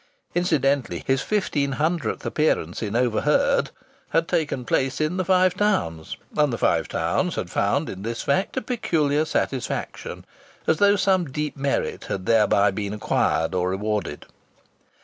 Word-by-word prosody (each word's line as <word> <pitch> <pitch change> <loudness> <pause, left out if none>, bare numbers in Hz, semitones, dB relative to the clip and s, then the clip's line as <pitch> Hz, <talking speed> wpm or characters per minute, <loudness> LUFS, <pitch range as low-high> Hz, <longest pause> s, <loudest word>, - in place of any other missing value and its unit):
Incidentally, 145 -7 +1
his 135 0 +1
fifteen 145 -9 0
hundredth 155 -4 -1
appearance 120 - 0
in 110 -1 -3
"Overheard" 120 -2 +2 0.4
had 165 0 +1
taken 145 -5 -1
place 135 +2 0
in 155 +4 0
the 185 - +1
Five 185 0 +3
Towns, 185 - -1 0.2
and 150 -2 +3
the 115 - -2
Five - - +1
Towns - - -1
had - - -4
found - - +1
in 95 - -6
this 115 +3 -4
fact 185 +8 0
a - - 0
peculiar 155 - +1
satisfaction, 135 -5 -3 0.4
as 160 - +2
though 205 +2 +5
some 185 -6 +1
deep 150 +2 -3
merit 140 -1 -2
had 95 -1 -4
thereby 105 -2 +4
been 100 +1 -4
acquired 85 -5 0
or 90 0 0
rewarded. 100 -5 -2
140 Hz, 150 wpm, -24 LUFS, 105-165 Hz, 0.4 s, though